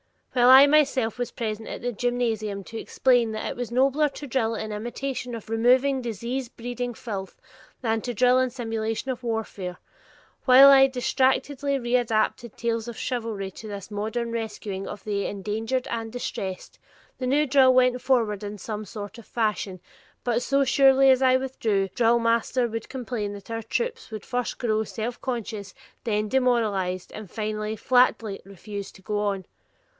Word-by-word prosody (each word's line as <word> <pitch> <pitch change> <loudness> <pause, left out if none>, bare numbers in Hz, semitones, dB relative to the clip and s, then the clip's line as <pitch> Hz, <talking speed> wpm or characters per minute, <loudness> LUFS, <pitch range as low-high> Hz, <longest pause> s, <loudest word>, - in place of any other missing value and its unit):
While 245 -1 +5
I 265 +2 +10
myself 275 -6 +2
was 245 - -1
present 220 -1 -4
at - - -6
the 245 - -1
gymnasium 225 -4 -1
to 225 - -8
explain 245 -4 +2
that 215 - -4
it - - -3
was 245 -1 -4
nobler 275 +4 +3
to 285 +1 -9
drill 230 -4 0
in 220 0 -4
imitation 240 +3 -4
of 220 -1 -9
removing 255 +4 +3
disease 240 +3 -3
breeding 245 +1 -5
filth 195 -6 -6 0.4
than 225 -2 0
to 245 - -4
drill 250 +3 +4
in 255 0 +2
simulation 225 0 -3
of 255 -1 -6
warfare; 210 -6 -3 0.7
while 265 +2 +9
I 270 -1 +8
distractedly 265 +2 0
readapted 240 -2 0
tales 230 -1 -2
of 235 - -7
chivalry 225 -6 -3
to 220 - -10
this 200 0 -7
modern 220 +3 -3
rescuing 210 -4 -4
of 205 - -8
the 200 -1 -2
endangered 220 +6 -2
and 225 -1 -3
distressed, 190 -6 -5 0.4
the 255 - -2
new 290 +4 +3
drill 265 -2 +5
went 250 -1 +3
forward 225 -6 +1
in 205 0 -5
some 215 +2 -5
sort 205 +3 -8
of 230 - -13
fashion, 210 -5 -2 0.4
but 240 -1 +1
so 275 +2 +2
surely 270 0 +5
as 260 0 +3
I 255 -1 +5
withdrew, 225 -7 0
the - - -39
drillmaster 235 +1 +2
would 225 +1 -5
complain 240 -5 -4
that 205 +2 -10
our 225 0 -2
troops 465 - -3
would 215 -2 -7
first 245 0 -2
grow 220 -2 0
self 225 +2 -5
conscious, 220 -6 -4 0.3
then 215 -2 0
demoralized, 215 -8 0
and 215 -3 -9
finally 215 +1 -3
flatly 230 -3 +2
refuse 200 +1 -8
to 190 - -17
go 210 +2 -2
on. 200 -3 -1
230 Hz, 165 wpm, -25 LUFS, 215-255 Hz, 0.7 s, I